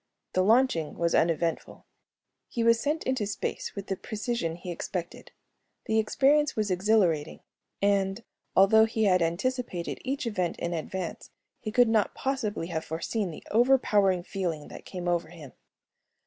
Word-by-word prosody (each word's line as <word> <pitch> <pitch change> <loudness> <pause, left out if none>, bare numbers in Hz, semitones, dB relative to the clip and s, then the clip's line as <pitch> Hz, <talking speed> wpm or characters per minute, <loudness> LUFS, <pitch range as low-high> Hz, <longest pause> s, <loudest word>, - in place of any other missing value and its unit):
The 185 - +3
launching 210 - +3
was 170 0 +1
uneventful. 165 0 0 0.6
He 235 - -2
was 230 0 +5
sent 295 +5 -1
into 260 -6 -1
space 205 - -4
with 200 -1 -5
the 195 - -2
precision 215 -6 -3
he 175 +1 -7
expected. 175 0 -6 0.5
The 220 0 +2
experience 280 +7 +3
was 210 -3 0
exhilarating 180 -5 +1 0.4
and, 200 +1 +1 0.3
although 220 +3 +6
he 225 0 -1
had 185 -3 +4
anticipated 180 +2 -2
each 270 0 -2
event 185 -7 -1
in 170 0 -3
advance, 170 +2 -5 0.3
he 215 - -5
could 245 +1 +5
not 220 -2 +1
possibly 225 -10 -2
have 160 -2 -2
foreseen 180 +5 -3
the 160 - -9
overpowering 210 -6 +3
feeling 170 -6 -4
that - - -11
came 180 -2 -6
over 170 -2 0
him. 160 -5 -12
195 Hz, 150 wpm, -28 LUFS, 170-230 Hz, 0.6 s, although